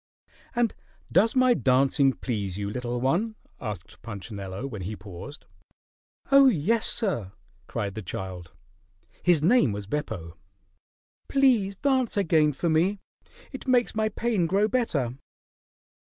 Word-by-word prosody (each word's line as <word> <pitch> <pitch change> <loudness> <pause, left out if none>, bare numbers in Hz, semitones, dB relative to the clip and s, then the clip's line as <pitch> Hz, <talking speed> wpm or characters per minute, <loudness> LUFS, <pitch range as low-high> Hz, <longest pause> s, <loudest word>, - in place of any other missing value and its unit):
"And 240 -2 +2 0.4
does 215 +7 +4
my 255 -1 +5
dancing 135 - +3
please 100 -8 -3
you, 100 0 -3
little 120 +1 -3
one?" 175 - 0 0.2
asked 105 -7 -7
Punchinello 100 0 -6
when 110 -8 -6
he 100 +4 -4
paused. 100 - -10 0.9
"Oh, 275 0 +8
yes, 220 - +2
sir!" 115 - -1 0.3
cried 100 -1 -3
the 110 - -5
child. 90 -3 -6 0.7
His 170 -4 +3
name 185 - +4
was 100 0 -5
Beppo. 100 - -4 0.9
"Please 245 -8 +3
dance 260 -1 +1
again 160 -6 +3
for 145 +5 -3
me. 170 +6 +2 0.5
It 265 -1 -8
makes 250 -2 +3
my 215 0 +1
pain 215 -5 0
grow 200 +4 +2
better." 145 - -1
150 Hz, 125 wpm, -26 LUFS, -, 0.9 s, Oh